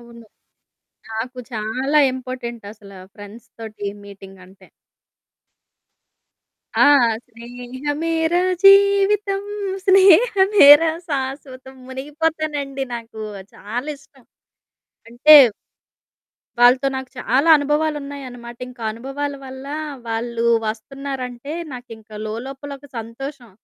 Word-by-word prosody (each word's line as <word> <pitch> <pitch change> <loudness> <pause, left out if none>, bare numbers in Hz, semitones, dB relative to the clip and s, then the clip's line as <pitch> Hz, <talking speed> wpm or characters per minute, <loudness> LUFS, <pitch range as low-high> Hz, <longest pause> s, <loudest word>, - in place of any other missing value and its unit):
అవును. 235 -1 -15 0.9
నాకు 235 +3 -5
చాలా 255 +7 -1
ఇంపార్టెంటసల 235 -5 -8 0.2
ఫ్రెండ్స్ 205 +2 -13
తోటి 215 -2 -7 0.2
మీటింగంటే. 195 -1 -15 2.1
ఆ! - - +7 0.4
స్నేహమేరా 285 +8 -3 0.3
జీవితం. 395 0 +4 0.4
స్నేహమేరా 380 -5 +6 0.2
శాశ్వతం. 265 -1 -5
మునిగిపోతానండి 290 0 -3
నాకు, 225 -2 -8 0.3
చాలా 245 +7 -6
ఇష్టం. 275 -2 -23 0.8
అంటే 250 +7 +6 1.3
వాళ్ళతో 250 +3 +5
నాకు 265 -1 -7
చాలా 270 +5 +1
అనుభవాలున్నాయన్నమాట. 285 -5 -3
ఇంకా 245 -2 -12
అనుభవాల 275 +5 -5
వల్ల, 265 0 -10 0.4
వాళ్ళు 230 +1 -3 0.2
వస్తున్నారంటే, 255 +3 -6 0.2
నాకింక 220 -4 -11
లోలోపల 265 +6 -7
ఒక 285 - -16
సంతోషం. 240 +2 -8
260 Hz, 75 wpm, -20 LUFS, 235-290 Hz, 2.1 s, ఆ